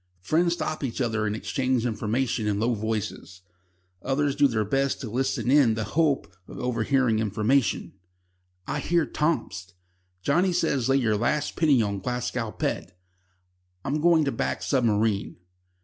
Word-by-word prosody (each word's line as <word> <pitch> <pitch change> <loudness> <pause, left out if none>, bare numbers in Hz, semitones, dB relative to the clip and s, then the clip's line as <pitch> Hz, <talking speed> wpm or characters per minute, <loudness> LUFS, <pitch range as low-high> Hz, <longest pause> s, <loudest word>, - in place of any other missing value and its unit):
Friends 170 - +2
stop 155 -3 -3
each 130 -1 -3
other 110 -4 0
and 105 - -1
exchange 130 +1 -1
information 115 0 -1
in 100 -1 0
low 120 +3 +1
voices. 105 -4 -4 0.6
Others 140 +1 0
do 145 0 +5
their 110 -4 -1
best 135 +5 0
to 115 - -5
listen 130 0 0
in 135 -6 +5
the 110 - -2
hope 150 - +1
of - - -10
overhearing 125 -1 +1
information: 110 +1 0 0.7
"I - - -2
hear 170 -2 +1
Tomsk," 125 - -2 0.5
"Johnnie 180 - +2
says 140 -7 0
lay 135 - +4
your 110 -5 +1
last 145 +7 0
penny 145 -8 +3
on 100 -1 -2
Glasgow 120 +1 -3
Pet," 90 - -4 0.9
"I'm 150 +2 -1
going 165 -2 +4
to 140 - 0
back - - -2
Submarine." 110 -5 +1
125 Hz, 150 wpm, -26 LUFS, 110-140 Hz, 0.9 s, do